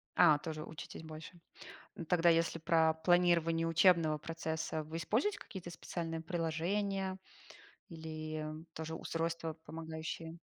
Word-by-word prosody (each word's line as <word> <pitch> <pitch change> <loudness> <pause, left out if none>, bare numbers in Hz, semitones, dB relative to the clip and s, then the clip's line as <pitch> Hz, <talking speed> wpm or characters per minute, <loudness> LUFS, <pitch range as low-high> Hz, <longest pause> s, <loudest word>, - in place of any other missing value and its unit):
А, 155 -4 +7
тоже 155 0 -5
учитесь 160 0 -8
больше. 155 +2 -9 0.6
Ну 170 - -6
тогда, 170 +1 +4
если 165 0 +3
про 160 -1 +4
планирование 165 -1 +3
учебного 165 -2 +5
процесса, 160 0 -3
вы 155 +2 -5
используете 235 - +1
какие-то 185 -3 -8
специальные 165 -1 -4
приложения 185 +4 -1 0.7
или 155 -2 -5 0.3
тоже 160 0 -4
устройства 165 0 -2
помогающие? 160 +1 -5
165 Hz, 115 wpm, -35 LUFS, 160-175 Hz, 0.7 s, А